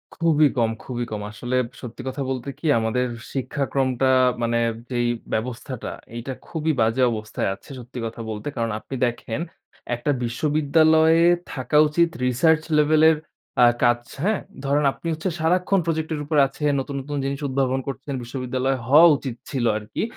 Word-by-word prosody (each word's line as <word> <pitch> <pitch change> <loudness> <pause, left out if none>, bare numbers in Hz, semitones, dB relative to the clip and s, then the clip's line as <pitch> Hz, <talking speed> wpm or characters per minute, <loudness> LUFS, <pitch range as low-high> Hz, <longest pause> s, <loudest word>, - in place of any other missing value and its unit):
খুবই 160 -3 +4
কম, 115 -2 +3
খুবই 120 -2 -4
কম। 105 -1 -3
আসলে 120 +4 -4 0.3
সত্যি 120 -3 -8
কথা 130 +2 -4
বলতে 130 +1 -3
কি? - - -9
আমাদের 115 +3 0 0.3
শিক্ষাক্রমটা 135 -1 0 0.3
মানে 115 0 +1 0.3
যেই 120 -1 0 0.3
ব্যবস্থাটা, 120 +2 -4 0.2
এইটা 120 +3 -5
খুবই 160 -1 -1
বাজে 115 +3 +2
অবস্থায় 110 -3 -3
আছে - - -20
সত্যি 125 +1 -8
কথা 115 +1 -6
বলতে। 105 +2 -5
কারণ 115 -2 -1
আপনি 135 - -7
দেখেন 120 +2 -3 0.5
একটা 135 +5 -1
বিশ্ববিদ্যালয়ে 155 +5 +3 0.3
থাকা 145 +2 0
উচিত 170 +3 +2 0.2
রিসার্চ 155 +6 +3 0.2
লেভেল 155 +1 +4
এর 160 - +3 0.5
আ - - +9 0.2
কাজ, 120 0 +4 0.2
হ্যাঁ? 210 +1 +2 0.3
ধরেন 145 +1 +2
আপনি - - -8
হচ্ছে 160 +4 -2
সারাক্ষণ 180 +4 +2
প্রজেক্ট 160 -1 -1
এর - - -5
উপর 150 +1 0
আছেন, 150 +2 -1
নতুন, 140 +1 -4
নতুন 145 +2 -5
জিনিস 140 0 -2
উদ্ভাবন 130 -1 0
করছেন। 140 +1 -5
বিশ্ববিদ্যালয় 130 +2 -2
হওয়া 155 +6 +8
উচিত 130 -4 -5
ছিল 130 -3 -1
আরকি। 105 0 -4
135 Hz, 160 wpm, -23 LUFS, 120-155 Hz, 0.5 s, আ